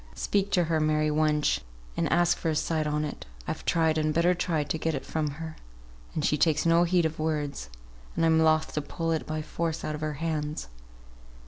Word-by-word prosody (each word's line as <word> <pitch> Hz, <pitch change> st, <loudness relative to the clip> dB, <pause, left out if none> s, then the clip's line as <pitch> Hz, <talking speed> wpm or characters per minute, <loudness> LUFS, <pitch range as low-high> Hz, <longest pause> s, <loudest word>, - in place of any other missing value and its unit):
Speak 200 Hz, -1 st, 0 dB
to 180 Hz, -, +4 dB
her, 160 Hz, -1 st, +1 dB
Mary, 155 Hz, 0 st, +2 dB
wench, 150 Hz, -, +2 dB, 0.4 s
and -, -, 0 dB
ask 175 Hz, 0 st, +4 dB
for 165 Hz, -, -2 dB
a 155 Hz, -, 0 dB
sight 155 Hz, 0 st, 0 dB
on 150 Hz, 0 st, 0 dB
it; 145 Hz, -, -7 dB, 0.2 s
I've -, -, -4 dB
tried, 160 Hz, -1 st, +2 dB
and 155 Hz, 0 st, +1 dB
better 170 Hz, +3 st, +3 dB
tried 165 Hz, -4 st, -1 dB
to 160 Hz, -, -1 dB
get 160 Hz, -1 st, 0 dB
it 135 Hz, -, -5 dB
from 155 Hz, -2 st, -1 dB
her, 160 Hz, -1 st, -6 dB, 0.6 s
and 155 Hz, -, 0 dB
she 150 Hz, -, +1 dB
takes 155 Hz, 0 st, +3 dB
no 170 Hz, +1 st, +5 dB
heed 175 Hz, -1 st, +2 dB
of 160 Hz, 0 st, -2 dB
words, 150 Hz, -, -2 dB, 0.5 s
and 165 Hz, -, +2 dB
I'm 160 Hz, 0 st, +4 dB
loth 160 Hz, 0 st, +3 dB
to 150 Hz, -, -1 dB
pull 165 Hz, +3 st, -3 dB
it 160 Hz, -, -1 dB
by 155 Hz, 0 st, -3 dB
force 165 Hz, 0 st, -3 dB
out 155 Hz, -, -2 dB
of 150 Hz, -, -6 dB
her 155 Hz, -1 st, -2 dB
hands." 150 Hz, -, -3 dB
155 Hz, 215 wpm, -28 LUFS, 150-165 Hz, 0.6 s, no